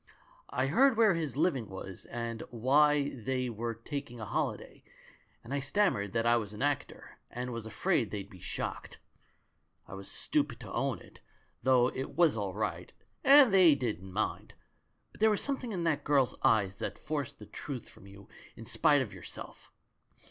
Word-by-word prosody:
I 130 - 0
heard 255 - +4
where 220 -4 +5
his 155 -6 -3
living 145 - +1
was, 95 -1 -8
and 115 -1 -4
why 140 +4 +3
they 125 0 -3
were 115 +1 -4
taking 120 0 -6
a 110 - -5
holiday, - - -3 0.6
and 120 +4 -7
I 140 - +1
stammered 135 - +1
that 115 0 0
I 120 0 +5
was 105 -3 -4
an 105 - -4
actor, 145 -1 -3
and 125 +1 -5
was 115 -1 -5
afraid 130 - 0
they'd 100 -2 -5
be 95 - -14
shocked. - - -5 0.9
I 85 - -10
was 95 0 -7
stupid - - -1
to - - -8
own - - 0
it, - - -16 0.4
though 125 -1 +4
it 130 +1 -6
was 170 -5 +4
all 100 -3 -3
right 90 -5 -3 0.3
and 275 -5 +8
they 180 -6 +7
didn't 105 -8 -4
mind; 105 +3 -3 0.6
but - - -18
there 220 - +6
was 210 - 0
something 265 -4 -3
in 180 -4 -2
that 155 -3 0
girl's 140 -4 +2
eyes 100 -3 +2
that - - -4
forced 145 -5 -4
the 105 - -11
truth 130 +3 -7
from 100 - -16
you 100 0 -14 0.3
in 115 - -10
spite 145 +2 +3
of 110 - -9
your - - -11
self. - - -9
125 Hz, 180 wpm, -31 LUFS, 110-150 Hz, 0.9 s, and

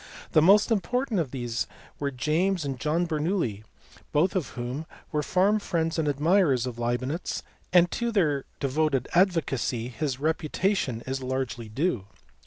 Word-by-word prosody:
The 155 - +5
most 205 +7 +6
important 225 +2 +1
of 155 -6 -1
these 120 -2 -3 0.3
were 140 - 0
James 155 +7 0
and 135 -3 -3
John 160 +5 +1
Bernoulli, 155 - -1 0.5
both 175 +7 +2
of 180 -7 0
whom 125 +6 -4 0.2
were 150 -1 0
warm 200 +4 +4
friends 165 -4 -1
and 155 - +1
admirers 145 - +3
of 120 -2 -5
Leibnitz, 130 +8 -2 0.3
and 175 -1 +5
to 235 -1 -1
their 150 -10 +1
devoted 140 -1 +1
advocacy 150 - +1
his 135 0 -3
reputation 155 - 0
is 135 +1 -3
largely 130 -3 -3
due. 125 - -1
150 Hz, 145 wpm, -27 LUFS, 130-180 Hz, 0.5 s, most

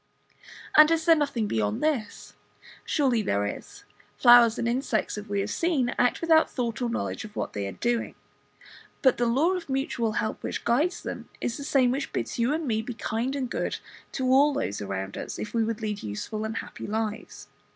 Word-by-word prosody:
And 305 0 +9
is 325 -1 +1
there 330 -1 +7
nothing 280 -7 0
beyond 105 - -1
this? 260 -10 -2 0.5
Surely 260 -7 +1
there 100 - 0
is. 410 - -7 0.3
Flowers 240 -2 +7
and 235 - -1
insects, 240 -2 -1
as 210 0 -7
we 200 -1 -1
have 205 +1 -3
seen, 310 -8 +1
act 245 - +2
without 320 -1 +4
thought 240 -1 -3
or 245 - 0
knowledge 235 - -3
of 215 0 -11
what - - -3
they 100 -1 -3
are - - -4
doing; 240 -1 -1 0.9
but 260 - +5
the 240 - +1
law 280 +10 +3
of 360 -5 -4
mutual 265 -5 -1
help 215 - -2
which - - -4
guides 305 +10 +1
them - - -6
is 230 - -2
the 280 - -6
same 265 -3 +3
which 275 +2 -3
bids - - -3
you 235 +3 +2
and 310 0 -1
me 220 -2 +1
be 240 +1 -6
kind 230 +4 -2
and 255 -4 -3
good - - -2 0.4
to 260 - -2
all 285 +3 +5
those 100 - -2
around 95 0 -4
us, - - -6
if 210 - -6
we 230 -1 +2
would 225 0 -3
lead 210 -1 -3
useful 215 - -4
and 220 0 -4
happy - - -7
lives. 215 +1 -4
240 Hz, 205 wpm, -27 LUFS, 215-280 Hz, 0.9 s, And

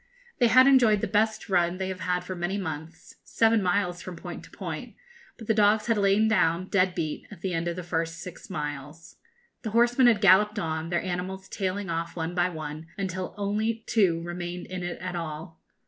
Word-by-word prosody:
They 240 - +5
had 255 +3 +7
enjoyed 240 -7 +5
the - - 0
best 220 +1 +1
run 175 -2 +2
they 190 0 -3
have 185 -1 -5
had 180 -1 -1
for 185 - -5
many 175 +3 -2
months 160 -3 -7
seven 225 -1 +3
miles, 180 -1 0
from 185 - -7
point - - -8
to - - -16
point - - -7 0.4
but 225 - -10
the 220 - +2
dogs 210 0 +3
had 230 - +2
lain 205 +1 +3
down, 180 -4 +2
dead 185 -2 +2
beat, 155 -3 -3
at 200 -5 -12
the 185 -1 -2
end 165 +1 -1
of 170 - -2
the 180 - -5
first 165 -1 -2
six 180 +4 -9
miles. 150 -1 -6 0.4
The 220 - -4
horsemen 240 +3 +4
had 225 -4 +5
galloped 210 +1 +5
on, 160 -3 -2
their 170 -1 0
animals 185 +1 -4
tailing 190 -1 -3
off 165 0 -3
one 165 0 -3
by 175 0 +2
one, 155 -1 -7
until 185 -2 -4
only 215 +3 -1
two 180 -7 +2
remained 175 +1 -5
in 185 0 -6
it 175 0 -4
at 180 0 -5
all. 160 -1 -6
185 Hz, 205 wpm, -27 LUFS, 170-205 Hz, 0.4 s, had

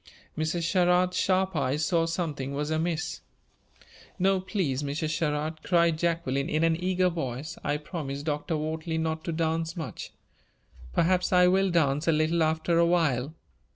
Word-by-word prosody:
Mrs. 160 +2 -1
Sherrard's 180 +1 +2
sharp 190 0 +1
eyes 145 +2 0
saw 165 -1 +1
something 150 -5 -3
was 150 +2 -2
amiss. 160 +1 -2 1.0
"No, 190 0 +2
please, 185 - -2
Mrs. 145 +2 -2
Sherrard," 155 0 -2
cried 170 -3 +2
Jacqueline, 165 -5 0
in 155 +1 +1
an 165 0 +3
eager 185 +1 +1
voice. 155 -1 -4
"I 145 0 0
promised 145 -2 -6
Dr. 150 +2 -2
Wortley 160 +1 -3
not 160 0 -2
to - - -2
dance 165 +1 -1
much; 160 -6 -6 0.8
perhaps 180 - +2
I 180 -1 +6
will 190 +2 +3
dance 150 -3 +1
a - - +5
little 155 +2 +1
after 160 +2 +1
a 170 - +5
while." 155 -4 +1
160 Hz, 155 wpm, -27 LUFS, 150-175 Hz, 1.0 s, I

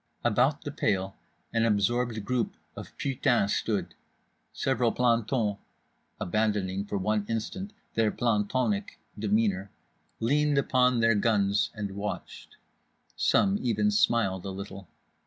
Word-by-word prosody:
About - - +2
the - - -4
pail 95 -1 -1 0.4
an 115 - +2
absorbed 110 +1 +1
group 125 -1 -1 0.2
of - - -7
putains 120 -6 +1
stood. 100 -6 -1 0.6
Several 125 -3 +1
plantons 115 -3 +1 0.6
(abandoning 100 -1 0
for 100 -1 -3
one 105 +2 0
instant 185 - -3 0.2
their 115 -1 +2
plantonic 105 -1 0 0.2
demeanour) 105 -2 +1 0.5
leaned 145 +5 +2
upon 125 -3 +3
their 115 0 +5
guns 100 -2 +2
and 105 -2 -4
watched. 100 +1 -6 0.6
Some 200 0 +3
even 170 - +1
smiled 115 - +2
a 100 - -5
little. 95 0 -7
110 Hz, 115 wpm, -28 LUFS, 100-125 Hz, 0.6 s, their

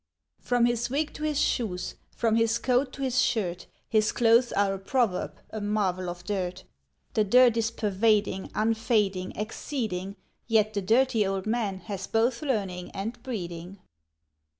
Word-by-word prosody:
From 245 -1 +2
his 240 0 0
wig 290 +4 -1
to - - -10
his 300 -2 0
shoes, 190 -11 -1 0.2
from 225 -1 +1
his 225 0 +2
coat 255 +1 +1
to 275 - -5
his 255 -2 +2
shirt, 180 -7 -1 0.2
His 215 -1 +2
clothes 235 +1 +4
are 200 -1 +2
a 195 - -5
proverb, 200 -2 0 0.2
a 220 - -5
marvel 195 -3 0
of 175 0 -7
dirt; 185 -1 -3 0.5
The 215 - +3
dirt 245 +3 +5
is 225 -1 +1
pervading, 210 -2 +1
unfading, 215 -4 +1
exceeding, 210 -4 -4 0.3
Yet 215 -2 +3
the 200 - -1
Dirty 230 +3 +3
Old 195 -1 -2
Man 215 -4 -1
has 195 -3 -5
both 235 +2 +1
learning 195 -11 -2
and 220 +5 -4
breeding. 180 -7 -6
215 Hz, 150 wpm, -27 LUFS, 195-235 Hz, 0.5 s, dirt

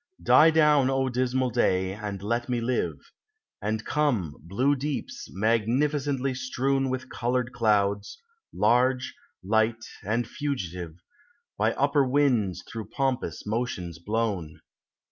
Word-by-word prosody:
Die 160 - +7
down, 150 -4 +4
O 135 0 +1
dismal 130 0 0
day, 95 -5 +1
and 100 -2 -6
let 120 +4 -1
me 120 -1 0
live; 120 +2 -1 0.6
And 110 +1 -2
come, 120 - 0
blue 125 - +1
deeps, 140 +1 -4
magnificently 130 +6 +1
strewn 135 +1 0
With 130 0 -3
colored 125 +1 -1
clouds, 100 -3 +1 0.2
— 450 - -64
large, 125 +4 +2 0.3
light, 110 +3 +1 0.2
and 115 +3 -1
fugitive, 90 - -4 0.3
— 285 0 -41
By 110 +2 +2
upper 140 +1 +2
winds 125 -8 +1
through 110 -2 -7
pompous 130 - -2
motions 105 -7 -3
blown. 100 -5 -2
120 Hz, 125 wpm, -27 LUFS, 105-135 Hz, 0.6 s, Die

